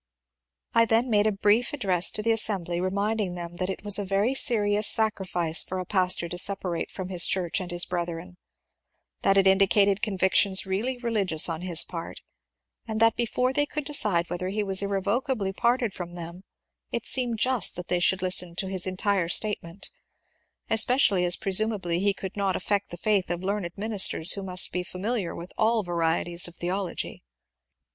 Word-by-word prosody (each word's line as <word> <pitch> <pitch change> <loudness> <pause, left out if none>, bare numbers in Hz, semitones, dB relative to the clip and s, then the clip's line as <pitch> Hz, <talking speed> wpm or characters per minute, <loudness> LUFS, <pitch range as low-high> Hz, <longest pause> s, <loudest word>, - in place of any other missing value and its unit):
I 230 0 +4
then 230 +2 +1
made 210 0 +3
a - - +2
brief 210 +5 +1
address 190 -10 +3
to 210 - -2
the 230 - +2
assembly 190 -6 -1
remind 200 +4 -1
ing 180 -3 -3
them 175 0 -7
that 185 +1 -3
it 195 - -6
was 205 -1 +2
a - - -2
very 200 +6 0
serious 210 -6 +3
sacrifice 185 -6 +1
for 185 - -5
a 185 - -4
pastor 185 -2 +1
to 175 - 0
separate 185 -3 -2
from 185 -1 -7
his 180 -2 +4
church 180 -2 -1
and 180 - -7
his 175 -1 0
brethren; 175 0 -5 0.8
that 195 0 +2
it 195 - +4
indicated 195 +1 +3
convictions 190 -1 +2
really 215 +7 -2
religious 210 -10 +2
on 165 -1 -4
his 175 -2 +2
part, 165 -2 -8 0.7
and 220 -1 -3
that 225 0 +4
before 250 +2 -1
they 290 +1 0
could 300 -1 -5
decide 210 - +2
whether 180 +1 -3
he 210 +3 -2
was 195 -1 +1
irrecoverably 200 +2 -2
parted 235 0 0
irom 175 -1 -8
them 170 +1 -8 0.5
it - - -4
seemed 245 -3 0
just 255 +1 +2
that 180 0 -6
they 180 - 0
should 185 +1 +1
listen 180 -2 +3
to 190 - -2
his 190 -1 0
entire 185 -2 -1
statement; 195 -3 -1 0.8
especially 220 -5 +3
as 175 0 +4
presumably 195 -3 -1
he 200 +2 +2
could 190 -1 -7
not 195 -2 -1
affect 200 +2 -2
the 175 - -8
&uth 200 0 0
of 175 +1 -4
learned 195 -2 -2
ministers 200 -5 +1
who 200 - 0
must 185 -2 +2
be 180 - -2
familiar 190 +2 -3
with 170 +2 -9
all 220 0 +2
varieties 170 0 +1
of 175 - -13
theology. 180 +1 -4
195 Hz, 180 wpm, -25 LUFS, 180-215 Hz, 0.8 s, I